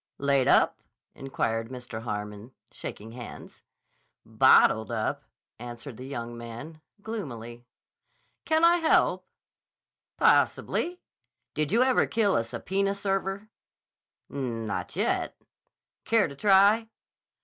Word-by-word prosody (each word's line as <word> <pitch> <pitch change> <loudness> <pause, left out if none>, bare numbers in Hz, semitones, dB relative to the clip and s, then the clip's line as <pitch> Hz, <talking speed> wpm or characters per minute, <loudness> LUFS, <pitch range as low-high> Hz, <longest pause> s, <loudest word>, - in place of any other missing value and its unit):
"Laid 140 -2 +2
up?" - - +4 0.3
inquired 115 -4 -3
Mr. 125 -3 -7
Harmon, 105 +1 -6 0.2
shaking 110 +2 -8
hands. 120 0 -10 0.6
"Bottled 110 0 +4
up," 110 -2 -2 0.3
answered 120 +1 -8
the 130 - -8
young 120 -3 -6
man 120 +7 -9 0.2
gloomily. 120 - -7 0.8
"Can 320 +1 +3
I 340 +1 +6
help?" 325 -2 +2 0.9
"Possibly. 355 +1 +2 0.5
Did 155 0 -1
you 235 +4 +4
ever 260 -1 +3
kill 210 -4 +1
a 115 - +2
subpoena 195 +13 -2
server?" 195 +1 -2 0.8
"Not 115 -6 -4
yet." - - -1 0.7
"Care 225 -5 +3
to 140 - -10
try?" 205 +6 +4
135 Hz, 105 wpm, -27 LUFS, -, 0.9 s, I